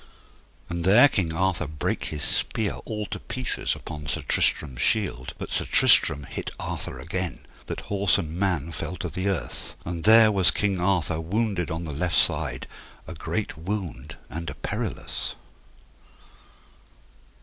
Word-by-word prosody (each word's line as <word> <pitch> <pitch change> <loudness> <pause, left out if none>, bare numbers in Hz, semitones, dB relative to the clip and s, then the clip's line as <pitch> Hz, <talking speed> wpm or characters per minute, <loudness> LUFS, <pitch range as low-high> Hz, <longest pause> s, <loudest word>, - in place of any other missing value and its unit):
And 85 0 -4
there 105 +10 +7
King 95 - 0
Arthur 90 -1 0
brake 75 0 -2
his 75 -2 -3
spear 110 -3 0
all 105 -1 -4
to - - -5
pieces 130 -2 -2
upon 75 -1 -8
Sir - - 0
Tristram's 65 -5 +2
shield. 95 - +1
But - - -7
Sir - - +2
Tristram 75 - +6
hit - - -5
Arthur - - -4
again, 90 +2 -4 0.2
that - - -4
horse 100 -1 +1
and 80 -4 -4
man 90 -5 0
fell 80 +2 -4
to 85 +1 -4
the 95 +5 -3
earth. 85 -8 -3
And 85 -1 -4
there 110 0 +7
was 95 -3 +4
King 100 -3 0
Arthur 90 -3 +1
wounded 100 0 -1
on 80 0 -3
the 80 -3 -5
left 80 +4 0
side, 70 -4 +1 0.4
a - - -7
great 85 +6 -3
wound 80 - -5
and 85 +1 -5
a - - -7
perilous. - - -3
85 Hz, 150 wpm, -25 LUFS, 80-100 Hz, 0.4 s, there